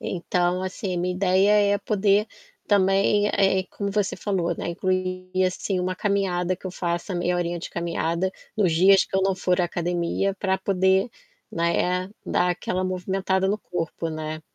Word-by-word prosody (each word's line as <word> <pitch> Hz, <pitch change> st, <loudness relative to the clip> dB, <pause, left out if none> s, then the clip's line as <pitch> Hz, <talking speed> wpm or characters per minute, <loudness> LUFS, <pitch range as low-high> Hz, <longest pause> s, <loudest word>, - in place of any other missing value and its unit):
Então, 180 Hz, 0 st, -1 dB
assim, 185 Hz, 0 st, -3 dB
minha 180 Hz, +1 st, -1 dB
ideia 200 Hz, +2 st, +3 dB
é -, -, 0 dB
poder 205 Hz, 0 st, +2 dB, 0.4 s
também 200 Hz, +1 st, +3 dB
é 195 Hz, -2 st, +2 dB
é -, -, -6 dB
como 200 Hz, +1 st, -5 dB
você 205 Hz, -1 st, -1 dB
falou, 185 Hz, -3 st, -1 dB
né, -, -, -4 dB
incluir 185 Hz, +1 st, -2 dB
assim 185 Hz, +1 st, -1 dB
uma 185 Hz, 0 st, -1 dB
caminhada 185 Hz, -3 st, 0 dB
que 190 Hz, -, -9 dB
eu -, -, -4 dB
faça 175 Hz, +1 st, -3 dB
meia 175 Hz, 0 st, 0 dB
horinha 175 Hz, 0 st, -2 dB
de 170 Hz, -, -6 dB
caminhada, 170 Hz, +1 st, -1 dB, 0.2 s
nos 195 Hz, -6 st, +2 dB
dias 190 Hz, +4 st, +5 dB
que -, -, -13 dB
eu -, -, +3 dB
não 195 Hz, 0 st, +2 dB
for 180 Hz, 0 st, +1 dB
à -, -, +3 dB
academia 175 Hz, +2 st, -1 dB
para 190 Hz, 0 st, 0 dB
poder, 190 Hz, +2 st, +2 dB, 0.4 s
né, 180 Hz, +2 st, 0 dB, 0.2 s
dar 180 Hz, -, +1 dB
aquela 180 Hz, +1 st, -2 dB
movimentada 190 Hz, +1 st, -1 dB
no 205 Hz, +2 st, 0 dB
corpo, 170 Hz, -3 st, -4 dB
né. 155 Hz, 0 st, -5 dB
185 Hz, 170 wpm, -24 LUFS, 175-195 Hz, 0.4 s, dias